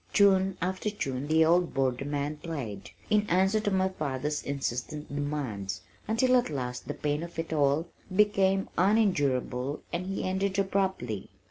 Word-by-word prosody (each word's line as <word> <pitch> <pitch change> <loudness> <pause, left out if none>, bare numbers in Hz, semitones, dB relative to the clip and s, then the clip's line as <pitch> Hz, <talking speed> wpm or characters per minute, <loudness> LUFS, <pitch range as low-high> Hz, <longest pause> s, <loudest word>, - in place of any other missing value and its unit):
Tune 195 -2 +4
after 185 +3 -1
tune 140 -9 -3
the 160 +1 +5
old 175 +1 +3
Borderman 140 +3 -1
played, 125 - -5 0.2
in 210 0 +3
answer 190 +4 +3
to 210 - 0
my 190 -1 +2
father's 150 -4 -2
insistent 140 +2 -3
demands, 145 -10 -3 0.3
until 250 +4 +3
at 245 - +1
last 125 -4 -4
the - - -3
pain 150 +1 -1
of 170 0 -8
it 165 0 -3
all 145 +2 +2 0.3
became 195 -2 +3
unendurable 145 - +1
and 180 +2 -2
he 195 - -2
ended 190 +1 0
abruptly. 190 - -1
160 Hz, 145 wpm, -29 LUFS, 140-190 Hz, 0.3 s, the